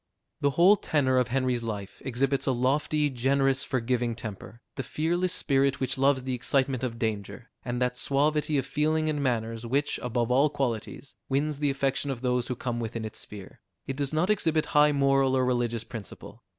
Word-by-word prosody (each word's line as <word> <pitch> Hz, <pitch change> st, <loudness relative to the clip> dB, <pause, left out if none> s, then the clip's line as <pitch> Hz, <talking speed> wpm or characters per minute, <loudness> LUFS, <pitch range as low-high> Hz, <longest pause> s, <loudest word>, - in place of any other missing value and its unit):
The 145 Hz, -, +2 dB
whole 190 Hz, +5 st, +7 dB
tenor 130 Hz, -7 st, +1 dB
of 125 Hz, -, +1 dB
Henry's 130 Hz, -1 st, 0 dB
life 105 Hz, -4 st, -6 dB
exhibits 135 Hz, +2 st, 0 dB
a -, -, +4 dB
lofty, 145 Hz, +4 st, +1 dB
generous, 135 Hz, +2 st, +2 dB
forgiving 120 Hz, -2 st, -1 dB
temper, 110 Hz, 0 st, -8 dB, 0.2 s
the 135 Hz, -, -3 dB
fearless 170 Hz, +7 st, 0 dB
spirit 140 Hz, -1 st, +2 dB
which 130 Hz, 0 st, -1 dB
loves 135 Hz, -1 st, +2 dB
the 130 Hz, 0 st, -2 dB
excitement 130 Hz, +1 st, 0 dB
of 120 Hz, -2 st, -3 dB
danger, 110 Hz, 0 st, -4 dB
and 120 Hz, -1 st, -3 dB
that 125 Hz, 0 st, -1 dB
suavity 150 Hz, +3 st, +1 dB
of 135 Hz, -, 0 dB
feeling 155 Hz, +1 st, 0 dB
and 145 Hz, -1 st, -2 dB
manners, 115 Hz, -3 st, -1 dB
which, 140 Hz, +5 st, 0 dB
above 120 Hz, 0 st, -1 dB
all 140 Hz, +4 st, +4 dB
qualities, 135 Hz, -1 st, -3 dB, 0.2 s
wins 145 Hz, +2 st, 0 dB
the 145 Hz, -1 st, +1 dB
affection 135 Hz, 0 st, -1 dB
of 130 Hz, -3 st, -4 dB
those 125 Hz, -1 st, 0 dB
who 125 Hz, -, -2 dB
come 120 Hz, -1 st, -3 dB
within 115 Hz, -1 st, -4 dB
its 110 Hz, -, -5 dB
sphere: 100 Hz, -3 st, -9 dB, 0.2 s
it 135 Hz, -, -4 dB
does 140 Hz, -1 st, -1 dB
not 165 Hz, +6 st, +1 dB
exhibit 160 Hz, -6 st, +1 dB
high 150 Hz, 0 st, +6 dB
moral 135 Hz, -2 st, +3 dB
or 130 Hz, -, +2 dB
religious 120 Hz, -2 st, 0 dB
principle. 110 Hz, -3 st, -9 dB
130 Hz, 185 wpm, -27 LUFS, 120-140 Hz, 0.2 s, whole